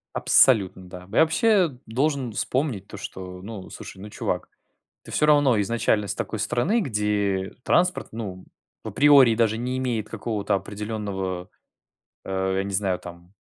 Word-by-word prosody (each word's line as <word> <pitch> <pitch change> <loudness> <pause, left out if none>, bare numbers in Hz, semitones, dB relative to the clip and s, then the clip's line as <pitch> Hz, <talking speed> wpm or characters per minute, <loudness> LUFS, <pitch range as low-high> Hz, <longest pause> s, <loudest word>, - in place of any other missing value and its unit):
Абсолютно, 95 -7 +4
да. 90 0 -9
Я - - +2
вообще 175 - +2
должен 130 +1 -1
вспомнить 120 -3 -2
то, - - -10
что: 90 -2 -8
ну, 100 -1 -8
слушай, - - -10
ну 105 - -8
чувак, - - -3 0.6
ты - - -12
всё 150 - +2
равно 145 -6 +4
изначально 105 -1 0
с - - -1
такой 110 - -4
страны, 120 - +1
где 105 - -1
транспорт 180 +1 +2
ну 95 -5 -6 0.4
априори 140 -5 +5
даже 110 -1 +1
не 125 +2 -3
имеет 120 -5 -2
какого-то 105 -2 -2
определенного, 100 -3 -4 0.8
э, 95 0 -1
я 95 - 0
не 100 - -5
знаю 95 -2 0
там, 85 +1 -12
105 Hz, 145 wpm, -24 LUFS, 95-130 Hz, 0.8 s, априори